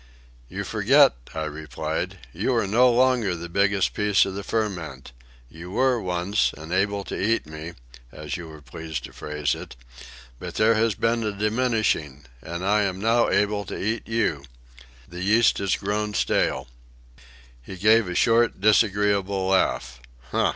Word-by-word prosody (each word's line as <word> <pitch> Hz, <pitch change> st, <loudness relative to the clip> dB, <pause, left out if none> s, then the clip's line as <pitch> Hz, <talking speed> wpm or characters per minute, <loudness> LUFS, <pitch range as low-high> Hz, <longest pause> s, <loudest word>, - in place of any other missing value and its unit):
"You -, -, -4 dB
forget," -, -, +4 dB, 0.2 s
I 80 Hz, -, -2 dB
replied. 80 Hz, +1 st, -4 dB, 0.2 s
"You -, -, 0 dB
are -, -, +1 dB
no 120 Hz, +6 st, +4 dB
longer 120 Hz, -6 st, +2 dB
the 85 Hz, +1 st, -7 dB
biggest 100 Hz, +2 st, +1 dB
bit 105 Hz, -2 st, +3 dB
of 95 Hz, -, -5 dB
the 100 Hz, -, -5 dB
ferment. 90 Hz, -, -3 dB, 0.4 s
You 85 Hz, +7 st, -11 dB
were, 125 Hz, +3 st, +1 dB
once, 90 Hz, +3 st, 0 dB
and 80 Hz, +3 st, -7 dB
able 100 Hz, +1 st, 0 dB
to -, -, -5 dB
eat 115 Hz, +3 st, +1 dB
me, 80 Hz, +2 st, -8 dB, 0.4 s
as 75 Hz, -2 st, -6 dB
you 85 Hz, -2 st, -7 dB
were 75 Hz, -2 st, -12 dB
pleased 80 Hz, -4 st, -6 dB
to -, -, -10 dB
phrase 75 Hz, -2 st, -2 dB
it; -, -, -8 dB, 0.6 s
but -, -, -7 dB
there 110 Hz, +1 st, +4 dB
has 110 Hz, -1 st, +1 dB
been 115 Hz, +2 st, 0 dB
a 105 Hz, -, -1 dB
diminishing, 105 Hz, -, -1 dB, 0.2 s
and 85 Hz, +5 st, -5 dB
I 105 Hz, +2 st, +3 dB
am 95 Hz, -2 st, -1 dB
now 115 Hz, +3 st, +2 dB
able 105 Hz, 0 st, +1 dB
to -, -, -6 dB
eat 110 Hz, +3 st, -2 dB
you. 115 Hz, -11 st, 0 dB, 0.6 s
The 90 Hz, +1 st, -8 dB
yeast 110 Hz, +4 st, +3 dB
has 100 Hz, -2 st, +1 dB
grown 105 Hz, +1 st, -2 dB
stale." -, -, 0 dB, 0.9 s
He 95 Hz, +10 st, -10 dB
gave 110 Hz, +2 st, +4 dB
a 90 Hz, -, -4 dB
short, 115 Hz, 0 st, +3 dB
disagreeable 100 Hz, -2 st, +2 dB
laugh. 95 Hz, -9 st, 0 dB
100 Hz, 160 wpm, -24 LUFS, 85-110 Hz, 0.9 s, forget